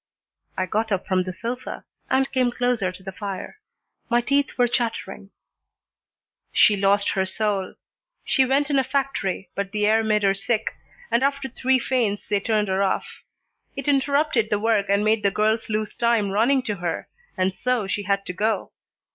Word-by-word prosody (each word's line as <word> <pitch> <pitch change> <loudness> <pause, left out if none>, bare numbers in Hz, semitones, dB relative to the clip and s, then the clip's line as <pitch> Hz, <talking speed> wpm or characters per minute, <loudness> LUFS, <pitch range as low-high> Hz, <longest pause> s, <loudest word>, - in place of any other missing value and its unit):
I 185 - +1
got 220 +3 -1
up 190 -2 0
from 185 -1 +1
the 185 - -3
sofa 235 +7 -5 0.3
and 265 +1 +2
came 255 -2 +2
closer 245 -6 0
to 185 +1 -14
the 190 - -6
fire. 200 - -6 0.5
My 240 0 +4
teeth 280 +3 0
were 245 -1 +4
chattering. 225 -5 -3 1.2
"She 210 - +5
lost 200 +1 +2
her 190 - +1
soul. 195 0 -2 0.5
She 265 - +3
went 275 +3 +1
in 275 - +4
a - - +2
factory, 260 -9 -2
but 200 -1 -3
the 210 0 0
air 220 +1 +4
made 215 -1 +1
her 195 -1 +4
sick, 215 +3 -1 0.4
and 235 - +3
after 275 0 0
three 260 +1 +1
faints 230 -6 -1
they 205 -1 +1
turned 210 0 0
her 190 +1 0
off. 195 -1 -1 0.5
It 275 -1 -5
interrupted 280 -4 +2
the 210 - +2
work 210 -1 +1
and 200 +1 +2
made 215 0 +3
the 200 - +3
girls 215 +3 0
lose 215 0 -2
time 235 -4 +1
running 245 +6 +3
to 210 -4 -3
her, 170 -2 -3 0.3
and 185 0 +1
so 250 -4 0
she 200 +1 -2
had 200 0 -1
to 180 - -4
go. 215 +4 -1
215 Hz, 180 wpm, -24 LUFS, 200-250 Hz, 1.2 s, She